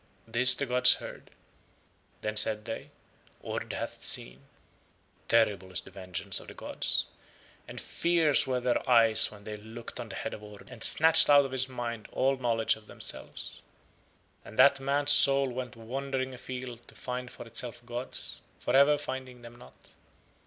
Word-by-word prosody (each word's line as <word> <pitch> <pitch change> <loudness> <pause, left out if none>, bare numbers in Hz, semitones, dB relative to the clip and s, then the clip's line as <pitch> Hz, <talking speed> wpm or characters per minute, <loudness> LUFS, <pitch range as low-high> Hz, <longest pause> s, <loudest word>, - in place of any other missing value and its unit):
This 120 +3 +6
the 140 - -3
gods 125 -1 +5
heard. - - -11 0.9
Then 105 0 -4
said 105 0 +4
They, 115 - -7 0.5
"Ord - - -6
hath - - -7
seen." 65 +2 -5 0.9
Terrible 105 -5 +1
is 90 - -4
the - - -16
vengeance 95 -2 -3
of - - -13
the - - -12
gods, - - 0 0.6
and - - -8
fierce 165 -5 +1
were 130 -1 -1
Their 125 0 -2
eyes 115 -3 +4
when 105 -1 -15
They 105 0 -8
looked 115 +3 -10
on 120 -2 -7
the 95 - -8
head - - -5
of - - -9
Ord 105 -1 -14
and 115 - -1
snatched 160 -1 +8
out 145 -1 +6
of 135 - -7
his 130 0 -2
mind 120 -3 -6
all 135 +1 +1
knowledge 115 -3 0
of 110 -1 -18
Themselves. - - -4 0.8
And 110 - -14
that 140 0 +5
man's 140 +2 +1
soul 140 -1 +5
went 125 -1 -7
wandering 130 +3 -5
afield 125 -1 -9
to - - -17
find 125 0 -6
for - - -11
itself 120 +1 -6
gods, 120 +1 -7 0.2
for 120 - -2
ever 140 +2 +5
finding 130 -3 -7
them 120 0 -13
not. 65 - -17
120 Hz, 165 wpm, -28 LUFS, 110-130 Hz, 0.9 s, snatched